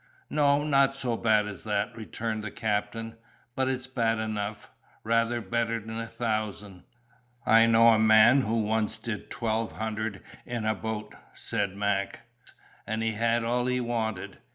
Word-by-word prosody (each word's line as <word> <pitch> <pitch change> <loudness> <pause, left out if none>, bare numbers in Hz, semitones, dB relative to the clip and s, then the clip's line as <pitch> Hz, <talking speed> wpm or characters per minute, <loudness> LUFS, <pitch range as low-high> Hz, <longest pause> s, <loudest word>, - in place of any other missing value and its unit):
"No, 145 -1 +3
not 135 -2 +3
so 130 -4 -2
bad 110 -2 +3
as 105 -1 -7
that," 105 -1 -1
returned 110 0 -4
the 110 - -4
captain. 110 +2 -3 0.4
"But 130 0 +1
it's 130 -1 -2
bad 115 -4 0
enough: 110 -1 -4 0.3
rather 115 +1 +1
better'n 115 -1 -2
a 115 - -4
thousand." 105 -5 -4 0.6
"I 115 +1 +6
know 115 0 +6
a 110 -1 +5
man 110 +4 +6
who 115 -2 0
once 110 +1 0
did 110 -2 -6
twelve 115 -1 -2
hundred 110 -2 -4 0.2
in 120 -2 -4
a 110 - +2
boat," 110 +1 -5 0.2
said 100 -1 -2
Mac, 100 0 -1 0.7
"and 110 +1 -2
he 115 - +1
had 115 +2 +1
all 120 +2 0
he 125 0 +1
wanted. 115 -5 -3
110 Hz, 155 wpm, -28 LUFS, 110-115 Hz, 0.7 s, I